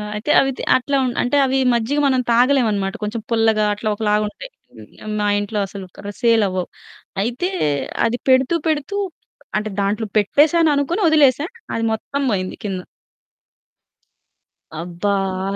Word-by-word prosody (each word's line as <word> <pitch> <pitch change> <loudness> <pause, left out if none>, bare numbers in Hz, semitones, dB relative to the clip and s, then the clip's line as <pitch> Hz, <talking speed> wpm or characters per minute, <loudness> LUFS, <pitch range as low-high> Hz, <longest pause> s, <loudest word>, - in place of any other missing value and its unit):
అయితే, 225 +8 -2
అవితే 270 -1 -2 0.2
అట్లా 275 +2 -1
ఉండు 245 - -3
అంటే 245 +4 +1
అవి 265 +1 0 0.2
మజ్జిగ 240 +6 0
మనం 260 -1 +2
తాగలేమనమాట. 230 -6 +2
కొంచెం 220 +2 -3
పుల్లగా, 220 -2 +3
అట్లా 215 +1 -3
ఒకలా 210 -1 0
ఉంటయి. - - -10 0.3
హ్మ్. 215 0 -9
మా 210 - +1
ఇంట్లో 205 +1 -3
అసలుకా 195 +1 -9
సేలవ్వవు. 205 -6 +2 0.6
అయితే, 245 +11 -2 0.6
అది 235 +1 0
పెడుతూ 260 +5 +4
పెడుతూ 310 +4 -1 0.6
అంటే 215 0 -2
దాంట్లో 210 +3 -1
పెట్టేశాననుకోని 295 - +3
ఒదిలేశా. 290 -2 +4 0.3
అది 230 - -1
మొత్తం 280 +6 -4
బోయింది 185 -2 -2
కింద. 195 -3 -3 2.0
అబ్బా! 175 +4 -2 0.4
ఆ 200 - -3
230 Hz, 125 wpm, -20 LUFS, 205-275 Hz, 2.0 s, పెడుతూ